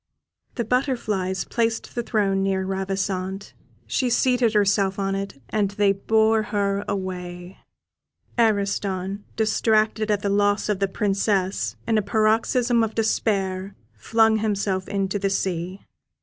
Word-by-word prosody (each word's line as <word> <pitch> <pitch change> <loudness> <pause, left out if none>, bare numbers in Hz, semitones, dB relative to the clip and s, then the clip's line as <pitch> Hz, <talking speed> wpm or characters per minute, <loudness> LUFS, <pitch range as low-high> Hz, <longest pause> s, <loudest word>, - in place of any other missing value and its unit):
The 235 - -1
butterflies 215 -7 -1
placed 230 -1 -1
the 240 - -1
throne 200 -4 0
near 190 -1 0
Ravissante; 195 0 -3 0.3
she 255 - 0
seated 245 -2 +2
herself 200 -1 +2
on 195 -1 -1
it, 195 -7 -4
and 210 -2 +1
they 200 0 +2
bore 220 +2 +2
her 200 -1 -1
away. 180 -2 -5 0.8
Ariston, 200 -3 0
distracted 220 0 +1
at 205 -1 +1
the - - 0
loss 205 +1 +2
of 205 -2 0
the 195 - +2
Princess, 195 - 0
in 220 -1 +3
a - - +1
paroxysm 225 +3 +2
of 220 -1 -3
despair, 195 -3 0 0.2
flung 220 - +2
himself 200 -3 -1
into 195 0 -1
the 195 0 0
sea. 185 -1 -2
200 Hz, 130 wpm, -23 LUFS, 195-220 Hz, 0.8 s, in